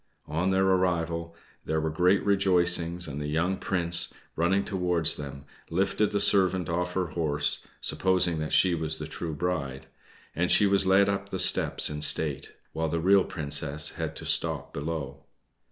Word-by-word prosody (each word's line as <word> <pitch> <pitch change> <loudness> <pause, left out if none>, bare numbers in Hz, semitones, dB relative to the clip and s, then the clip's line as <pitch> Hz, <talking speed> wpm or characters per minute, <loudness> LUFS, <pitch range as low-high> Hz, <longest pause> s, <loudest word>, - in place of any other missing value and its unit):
On 80 +5 -1
their 95 0 +2
arrival 85 -3 0 0.3
there 80 0 -1
were 80 0 -2
great 90 +5 +2
rejoicings, 90 -3 +2
and 70 0 -6
the 75 - -3
young 85 +5 0
Prince, 85 -2 0 0.2
running 95 +4 +1
towards 90 -5 0
them, 70 -1 -8 0.2
lifted 95 +4 0
the 100 - 0
servant 95 -3 +2
off 90 +1 -2
her 90 -3 -1
horse, 75 -3 -1 0.2
supposing 90 -3 +1
that 75 0 -4
she 95 -2 +3
was 80 -1 -1
the 75 - -6
true 80 +1 -5
bride; 70 -6 -3 0.5
and 90 +2 0
she 105 - +5
was 100 -1 +2
led 95 +1 +4
up 100 0 -2
the 95 - -4
steps - - +1
in 75 0 -5
state, 75 -1 +1 0.2
while 80 0 -2
the 85 - -1
real 95 +3 +4
Princess 75 -1 -1
had - - -5
to - - -7
stop - - 0
below. 70 -2 -5
85 Hz, 170 wpm, -27 LUFS, 80-95 Hz, 0.5 s, she